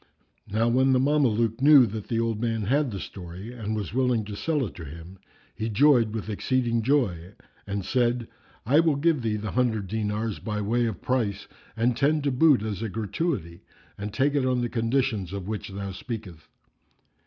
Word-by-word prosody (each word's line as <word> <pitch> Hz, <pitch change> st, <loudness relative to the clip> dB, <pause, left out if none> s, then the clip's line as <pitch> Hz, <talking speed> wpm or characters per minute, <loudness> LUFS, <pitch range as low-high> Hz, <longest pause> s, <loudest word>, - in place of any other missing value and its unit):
Now 110 Hz, +3 st, +1 dB
when 130 Hz, +3 st, +3 dB
the 130 Hz, -, +4 dB
Mameluke 125 Hz, -5 st, +2 dB
knew 140 Hz, -2 st, +8 dB
that 110 Hz, -1 st, -6 dB
the 115 Hz, -, -1 dB
old 115 Hz, -2 st, -1 dB
man 115 Hz, -2 st, -1 dB
had 140 Hz, +6 st, +1 dB
the 100 Hz, -4 st, -5 dB
story 95 Hz, +6 st, -8 dB
and 110 Hz, -3 st, -4 dB
was 105 Hz, -2 st, -4 dB
willing 125 Hz, -4 st, +1 dB
to 105 Hz, 0 st, -6 dB
sell 145 Hz, +6 st, 0 dB
it 100 Hz, -, -7 dB
to 85 Hz, -, -9 dB
him, 85 Hz, +5 st, -10 dB, 0.3 s
he 110 Hz, -, -3 dB
joyed 120 Hz, -1 st, +4 dB
with 110 Hz, -1 st, -5 dB
exceeding 115 Hz, +2 st, 0 dB
joy 105 Hz, -, 0 dB, 0.3 s
and 100 Hz, -1 st, -3 dB
said, 120 Hz, -1 st, +1 dB, 0.4 s
"I 140 Hz, +7 st, +4 dB
will 160 Hz, -3 st, +3 dB
give 155 Hz, 0 st, +2 dB
thee 110 Hz, -2 st, -1 dB
the 105 Hz, 0 st, -4 dB
hundred 115 Hz, -5 st, 0 dB
dinars 105 Hz, +1 st, -2 dB
by 105 Hz, -2 st, -3 dB
way 115 Hz, +3 st, +1 dB
of 110 Hz, -6 st, -5 dB
price 110 Hz, -6 st, -1 dB, 0.3 s
and 120 Hz, +1 st, +2 dB
ten 145 Hz, +3 st, +2 dB
to 140 Hz, -, +1 dB
boot 135 Hz, -3 st, +4 dB
as 105 Hz, -3 st, -4 dB
a 115 Hz, -, -2 dB
gratuity 105 Hz, -, -3 dB, 0.3 s
and 105 Hz, +1 st, -5 dB
take 135 Hz, +6 st, +1 dB
it 140 Hz, -2 st, +1 dB
on 130 Hz, -1 st, +1 dB
the 120 Hz, -, -1 dB
conditions 115 Hz, -5 st, 0 dB
of 100 Hz, -2 st, -5 dB
which 105 Hz, -1 st, -4 dB
thou 100 Hz, 0 st, -5 dB
speakest." 105 Hz, -, -7 dB
115 Hz, 190 wpm, -26 LUFS, 105-130 Hz, 0.4 s, knew